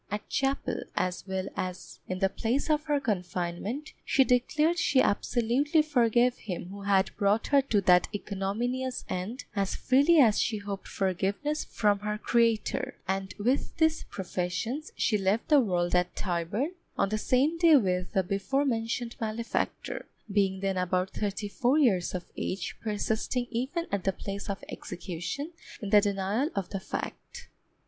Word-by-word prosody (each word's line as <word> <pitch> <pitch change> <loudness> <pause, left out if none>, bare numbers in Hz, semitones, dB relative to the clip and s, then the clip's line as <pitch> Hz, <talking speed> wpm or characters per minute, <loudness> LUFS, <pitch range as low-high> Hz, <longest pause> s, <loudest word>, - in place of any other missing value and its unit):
At 210 +1 -4
chapel, 270 +1 0
as 185 +1 -1
well 190 0 -2
as 185 0 -5
in 185 - -2
the 195 +1 +3
place 240 +10 -1
of 300 0 +1
her 295 -2 +2
confinement, 185 - -3
she 270 - +4
declared 300 +7 +2
she 270 - +3
absolutely 250 +8 +2
forgave 245 -4 +3
him 180 -3 -6
who 200 +1 -8
had 200 -1 +2
brought 205 +2 +2
her 280 -1 +4
to 220 -6 +1
that 180 -1 +5
ignominious 220 +6 -2
end, 205 +9 -4
as 195 -1 0
freely 285 +6 +4
as 230 -8 +6
she 220 - 0
hoped 205 -1 -6
forgiveness 200 - -1
from 205 -2 +1
her 210 +1 -2
Creator; 230 -1 +1
and 190 0 -2
with 250 +10 0
these 320 -1 +2
professions 190 - -3
she 215 -4 +1
left 195 +4 0
the 300 -2 +7
world 175 -6 0
at 180 0 +2
Tyburn, 185 - -1 0.3
on - - +2
the 215 +1 -1
same 280 +8 +2
day 330 -2 +7
with 180 -6 0
the 190 -2 +3
before 200 +10 0
mentioned 230 -1 -1
malefactor, 225 +1 -2 0.2
being 195 -1 +1
then 195 -1 0
about 180 +1 0
thirty 205 0 -3
four 250 +7 +1
years 195 - +2
of 180 - -4
age, 190 -1 -3
persisting 220 +3 -1
even 265 +8 -2
at 200 -2 -1
the 195 - +2
place 200 +2 -6
of 195 - -4
execution 180 - -5 0.3
in 205 -5 -5
the 210 - +7
denial 200 +7 0
of 195 -3 -2
the 195 - -3
fact. 485 - -6
210 Hz, 160 wpm, -29 LUFS, 190-255 Hz, 0.3 s, the